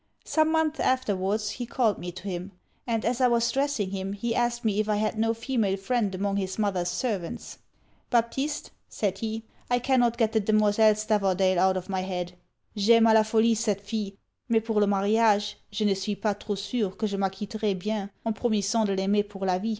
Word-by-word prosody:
Some 315 0 +2
months 320 -1 +1
afterwards 210 -4 0
he 245 -2 -5
called 230 -4 +1
me 175 0 -5
to 185 - -11
him; 190 0 -5 0.3
and 225 -2 -1
as 245 +2 0
I 255 - +6
was 235 -1 +2
dressing 275 -8 -1
him 195 0 -3
he 230 +3 -2
asked 240 0 0
me 210 -1 +1
if 215 0 0
I 210 - +2
had 215 +1 0
no 225 +1 +1
female 225 -5 0
friend 205 -1 -1
among 200 +1 -1
his 190 -1 -3
mother's 190 -5 0
servants. 200 -7 -4 0.5
'Baptiste,' 265 +5 -1 0.2
said 195 -2 -2
he, 225 0 -3 0.3
'I 245 - +3
cannot 245 -2 +2
get 225 -2 +2
the 220 - +2
Demoiselle 215 +1 +4
Stavordale 195 -3 +1
out 190 0 +3
of 180 - -5
my 190 -2 -2
head. 180 -1 -4 0.4
_J'aime 225 +2 +5
a - - +5
la 220 - +7
folie 220 +1 +3
cette 215 -3 -1
fille 205 -1 -4 0.4
mais 225 -1 +3
pour 220 -1 0
le 205 - +3
mariage, 205 +1 +2
je 210 +1 -1
ne 205 - +4
suis 195 +2 -3
pas 210 0 0
trop 205 0 -5
sur, 200 -1 -2
que 220 - -1
je 200 -1 -3
m'acquitterai 200 +2 -2
bien, 205 +1 -3 0.2
en 225 - 0
promissant 215 0 +1
de 195 - 0
l'aimer 195 +2 +2
pour 205 -1 -7
la 185 -1 +1
vie. 220 +4 -3
210 Hz, 205 wpm, -27 LUFS, 195-230 Hz, 0.5 s, la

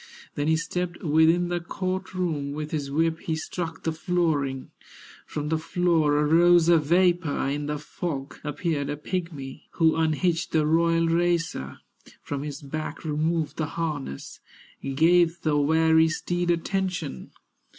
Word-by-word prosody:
Then 145 +1 -2
he 160 - +4
stepped 175 +1 -4
within 165 +3 +3
the 175 0 -1
court 185 +2 -4
room, 155 -6 -2
With 150 0 -5
his 145 -3 -2
whip 160 +3 +1
he 160 - -2
struck 160 +1 -5
the 160 - 0
flooring, 155 -5 -1 0.6
From 150 0 -4
the 160 0 +1
floor 165 -3 +2
arose 165 +3 +5
a 170 -1 +6
vapor, 175 -1 +2
In 145 +1 -2
the 150 0 -2
fog 145 -2 -5
appeared 150 -2 -2
a 145 - -3
pigmy, 150 -5 -5
Who 160 -1 +3
unhitched 165 +2 0
the 155 -2 +3
royal 165 +1 +3
racer, 170 - 0 0.4
From 140 -1 -4
his 145 0 -6
back 155 +3 -5
removed 155 +1 -1
the 155 - -1
harness, 150 - -4 0.4
Gave 165 +5 +3
the 155 -2 +2
weary 160 +2 +4
steed 175 +2 -2
attention. 175 - -2
160 Hz, 140 wpm, -26 LUFS, 150-175 Hz, 0.6 s, a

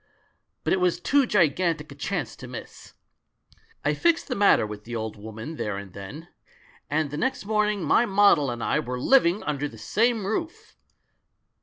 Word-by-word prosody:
But - - +1
it 190 - +2
was 180 -1 +1
too 280 -2 +2
gigantic 165 -5 +1
a - - -7
chance 145 - -3
to 125 - -9
miss. 125 -1 -10 0.9
I 150 - +3
fixed 335 - +1
the 255 - -1
matter 200 - +4
with 105 0 -8
the 120 +1 -6
old 110 -1 -4
woman 110 +8 -8
there 105 -2 -3
and 100 -2 -9
then 100 - -9 0.3
— - - -29 0.2
and 150 -1 0
the 145 - -4
next 260 - -1
morning 210 -2 +1
my 240 - +3
model 195 - +4
and 120 -1 -4
I - - +1
Were 125 +1 -4
living 195 - +4
under 145 -1 -2
the 115 - -13
same 225 - +1
roof! 320 - -4
155 Hz, 180 wpm, -25 LUFS, -, 0.9 s, matter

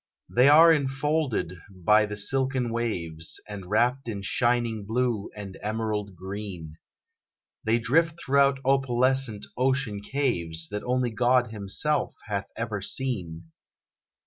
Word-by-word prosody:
They 125 +3 +4
are 165 +3 +8
infolded 135 - -1
by 105 +3 +3
the 105 0 -6
silken 130 +2 +1
waves, 85 -9 -2
And 100 -3 -8
wrapped 120 +4 +1
in 100 -3 -5
shining 120 0 0
blue, 115 0 -1
and 100 -2 -8
emerald 105 -2 -3
green; 95 -4 -7 0.9
They 110 +1 +2
drift 160 +8 +1
through 140 -1 +3
opalescent 130 -3 +1
ocean 130 -5 0
caves, 85 - -2
That 105 0 -4
only 125 -1 0
God 120 +1 +2
Himself 110 +9 0
hath 100 -2 -3
ever 110 -3 -3
seen. 90 -10 -3
115 Hz, 120 wpm, -26 LUFS, 100-130 Hz, 0.9 s, are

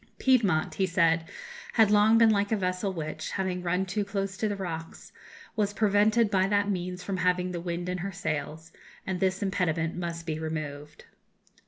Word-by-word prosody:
"Piedmont," 210 -12 +2
he 190 - 0
said, 165 -2 +2 0.4
"had 220 -3 +5
long 210 +2 +5
been 225 -1 +6
like 205 0 +1
a 220 - +2
vessel 185 +1 -1
which, 155 -2 -5
having 185 -2 -2
run 180 +2 0
too 205 +2 -1
close 195 -1 -3
to 215 +3 -1
the 205 - -2
rocks, 165 -4 -6 0.4
was 205 -2 0
prevented 210 +1 +3
by 190 -2 +3
that 205 0 +2
means 180 -1 -4
from 190 0 -3
having 180 0 +1
the 175 -1 -4
wind 175 0 -4
in 180 0 -2
her 195 +3 -4
sails, 160 -2 -4 0.3
and 190 -1 -2
this 190 +1 0
impediment 165 -4 0
must 170 -1 -4
be 155 -2 -3
removed." 150 -2 -6
185 Hz, 180 wpm, -28 LUFS, 170-200 Hz, 0.4 s, been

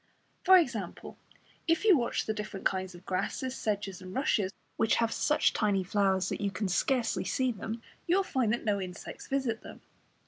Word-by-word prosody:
For 375 0 +8
example, 230 - -2 0.5
if 330 +5 +2
you 405 -5 +8
watch 240 -5 0
the 220 - -1
different 210 -2 -6
kinds 185 -1 0
of 175 - -14
grasses, 255 +7 -2
sedges 200 -4 -2
and 185 0 -9
rushes, 220 -9 +1 0.2
which 225 - +3
have 230 -1 +1
such 300 +1 +2
tiny 200 -3 +1
flowers 190 -1 +1
that - - -3
you 200 - +1
can 205 +1 -2
scarcely 240 +5 +1
see 255 -1 +1
them, 225 +1 -6 0.2
you 345 - +4
will 390 - +3
find 255 - 0
that 235 - -1
no 205 -2 +1
insects 180 0 -7
visit 260 -5 -1
them. - - -11
215 Hz, 185 wpm, -30 LUFS, 195-260 Hz, 0.5 s, For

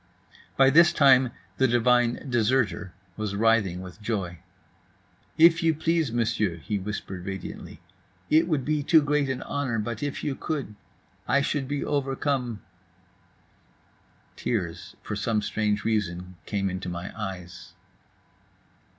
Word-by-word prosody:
By 135 0 +6
this 170 +3 +6
time 135 -5 +5 0.3
the 130 - +4
divine 120 +1 +2
"deserter" 120 -4 +1 0.3
was 105 -2 -3
writhing 105 -4 +2
with 95 +3 -11
joy. 95 -6 -3 1.0
"If 165 +1 +6
you 165 -1 +2
please, 160 -3 0
Monsieur," 115 -5 0
he 100 +5 -3
whispered 95 -2 -5
radiantly, 95 -1 -7 0.5
"it 160 +2 +4
would 150 -6 0
be 150 0 0
too 155 +1 +5
great 145 -1 +1
an 130 - -3
honor, 140 -5 -2
but 110 +1 -3
if 145 -1 -3
you 145 - -1
could—I 140 0 -4
should 140 -1 -1
be 145 0 -2
overcome…." 135 -4 -1 1.7
Tears 90 -8 -3
(for - - -4
some 110 -2 0
strange 105 0 -1
reason) 90 -5 -2
came 100 -2 -1
into 90 0 -4
my 85 +1 -6
eyes. 95 -4 -7
115 Hz, 125 wpm, -26 LUFS, 100-140 Hz, 1.7 s, By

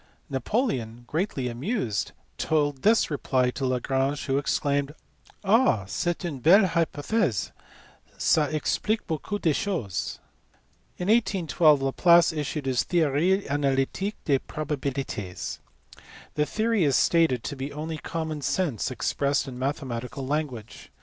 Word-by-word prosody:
" - - -39
Napoleon, 125 - -1
greatly 150 - -2
amused, 120 - -2 0.3
told 145 -3 0
this 220 -4 +3
reply 130 -3 +1
to 130 +1 -2
Lagrange, 135 +3 0
who 135 -1 +1
exclaimed, 145 +1 0 0.3
" - - -27
Ah! 200 - +3
c 100 - -2
est 175 +1 -3
une 150 -6 -4
belle 190 - +6
hypothese; 165 - 0 0.7
^a 150 -2 +2
explique 210 +8 -1
beaucoup 175 +4 -3
de 160 -6 +2
choses." 140 - -2 0.8
In 180 - -3
1812 175 -9 +3
Laplace 170 +5 +5
issued 150 -1 -3
his 130 -2 +1
TJieorie 175 +3 +2
analytiqne 140 +7 0
des 140 -3 +3
proba 150 +1 -4
bilites. 130 -9 -4 0.7
The 150 0 0
theory 220 -3 +1
is 140 -3 +3
stated 160 -8 +3
to 145 - -4
be 135 +1 -5
only 155 +2 -5
common 160 -1 -4
sense 145 - -1
ex 120 -3 -2
pressed 140 0 0
in 125 -2 -7
mathematical 130 -1 -3
language. 135 -6 -4
145 Hz, 135 wpm, -26 LUFS, 130-170 Hz, 0.8 s, belle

